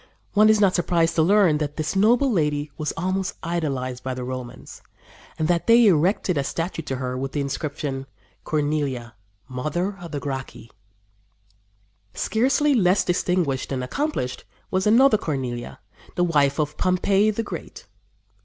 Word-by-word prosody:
" - - -40
One 215 +1 +5
is 215 -1 +5
not 195 -3 +4
surprised 170 -2 +1
to 165 - +2
learn 180 -3 +4
that 145 -1 -3
this 155 +4 -2
noble 240 +7 +4
lady 150 -5 0
was 155 - -3
almost 185 +2 -2
idolized 135 -7 -3
by 130 -1 -3
the 125 - -5
Romans, 125 -1 -7 0.6
and 155 - 0
that 170 -1 0
they 235 +1 +7
erected 180 -2 +2
a - - 0
statue 165 +4 -3
to 135 -4 -4
her 125 -1 -3
with 135 +1 -4
the 145 - -1
inscription, 140 -1 -4 0.4
"Cornelia, 145 -6 -2 0.3
Mother 155 +10 -3
of 170 - -8
the 145 - -3
Gracchi." 135 -4 -6 1.4
Scarcely 275 +6 +2
less 190 -5 +3
distinguished 175 -7 0
and 130 -2 -2
accomplished 205 - -3 0.3
was 190 +1 +1
another 230 0 +5
Cornelia, 125 - -4 0.4
the 175 - +1
wife 145 -5 +2
of 150 0 -1
Pompey, 195 +3 +2
the 215 +2 -1
Great. - - -8
160 Hz, 155 wpm, -23 LUFS, 135-190 Hz, 1.4 s, they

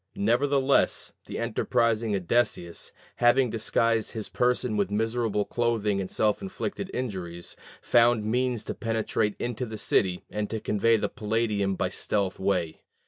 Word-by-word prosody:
Nevertheless, 135 +6 +2
the - - -5
enterprising 115 -2 +1
Odysseus, 95 -2 0 0.3
having 120 0 +4
disguised 115 0 +1
his 110 -2 -5
person 125 -2 +1
with 100 -2 +1
miserable 110 0 0
clothing 110 -4 0
and 95 - -5
self 105 -1 +1
inflicted 195 0 -4
injuries, 90 -8 -5 0.3
found 120 -2 +4
means 120 0 0
to - - -4
penetrate 110 -2 -1
into 120 +1 -3
the 110 0 -6
city 95 -3 +1
and 105 -1 -2
to 110 - -3
convey 115 +2 +2
the - - 0
Palladium 105 -3 -1
by - - -1
stealth 100 -3 -1
away. 90 -5 -1
110 Hz, 140 wpm, -27 LUFS, 100-120 Hz, 0.3 s, having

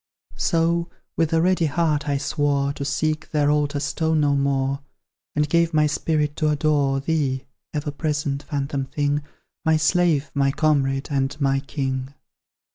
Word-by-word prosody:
So, 170 0 +1 0.3
with 165 -1 +1
a 165 0 +3
ready 180 -2 +3
heart, 150 -1 0
I 140 - +1
swore 140 0 0
To 140 - -5
seek 155 +3 -1
their 145 -2 +2
altar 145 -1 +1
stone 160 +3 0
no 145 -1 +3
more; 140 0 0 0.6
And 150 0 +2
gave 170 +1 +2
my 150 0 +5
spirit 150 0 0
to 155 -2 +2
adore 145 -2 +2
Thee, 135 -3 -1 0.3
ever 150 -1 -3
present, 145 -2 -2
phantom 140 -1 -3
thing 145 +2 0 0.4
My 160 -1 +3
slave, 155 -2 +2
my 140 -1 +2
comrade, 135 -2 +1
and 140 +1 -1
my 135 -1 +2
king. 135 -1 -3
145 Hz, 150 wpm, -23 LUFS, 140-155 Hz, 0.6 s, my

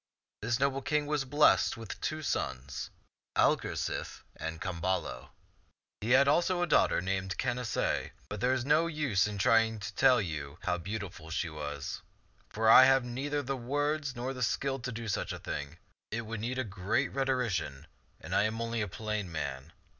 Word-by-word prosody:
This 120 +3 0
noble 135 0 +1
king 150 +2 0
was 145 -2 0
blessed 145 -2 +4
with 115 -2 -8
two 155 0 -2
sons, 65 - -3 0.5
Algar - - +3
sife - - -4
and 80 0 -5
Camballo. 95 0 -2 0.7
He 110 - -4
had 140 +1 +5
also 175 +4 +3
a - - 0
daughter - - +3
named 95 +1 -2
Canacee; 125 -2 -1 0.2
but 105 0 -6
there 125 +1 +3
is 130 -1 0
no 155 +4 +4
use 140 - +1
in 105 - -4
my 100 - -2
trying 115 -1 +4
to 100 - -6
tell 130 -2 +5
you 75 -6 -4
how 90 -2 0
beautiful 95 -3 -6
she 80 0 -2
was, 75 -2 -5 0.5
for 110 +1 0
I 130 +3 +10
have 135 -1 +4
neither 140 +4 -2
the 135 +1 -2
words 145 +2 -1
nor 125 +2 -3
the 130 - -7
skill 135 +4 0
to 125 0 -4
do 115 0 -5
such 100 - -1
a - - -4
thing; 75 +2 -5 0.3
it 115 - -2
would 115 -1 -5
need 120 +4 -3
a 130 - +1
great 105 +6 -1
rhetorician, 115 - -1 0.3
and - - -7
I 105 - +4
am 110 +1 -2
only 115 0 -1
a 105 - -1
plain 105 -1 -3
man. 70 -1 -4
115 Hz, 185 wpm, -31 LUFS, 95-135 Hz, 0.7 s, I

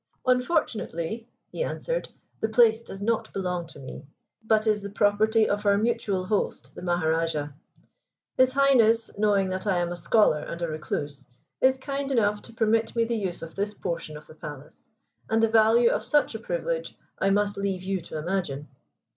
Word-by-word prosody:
"Unfortunately," 230 - 0 0.2
he - - -2
answered, - - -3 0.3
"the 220 - 0
place 225 0 +5
does 195 -4 -9
not 225 +1 0
belong 180 -3 -2
to - - -14
me, 130 -2 -9 0.4
but 220 0 +2
is 210 -1 +2
the 200 - -6
property 215 +2 +3
of 205 0 -1
our 200 -1 +4
mutual 210 -4 0
host, 205 +1 -2
the - - -9
Maharajah. 165 -4 0 0.8
His 255 0 +4
Highness, 235 -5 +4
knowing 200 -2 +3
that 185 +2 -4
I 190 -3 +2
am 175 0 0
a - - -3
scholar 175 -1 +3
and 170 - -6
a - - 0
recluse, 150 -2 -4 0.3
is 260 0 +4
kind 275 +1 -4
enough 210 -4 +2
to - - -13
permit 225 0 +1
me 230 - +3
the 235 - -2
use 190 -6 -3
of 165 - -8
this 205 +1 -3
portion 165 -4 -4
of 150 - -13
the - - -14
palace; 150 -2 -11 0.4
and 225 0 +2
the - - +6
value 225 +2 +5
of - - -1
such 295 -4 +2
a 220 - -5
privilege - - -3 0.2
I 195 - +2
must 205 +1 +2
leave 195 -2 -2
you 190 -1 -2
to 160 - -7
imagine." 155 -4 -3
205 Hz, 180 wpm, -26 LUFS, 175-230 Hz, 0.8 s, the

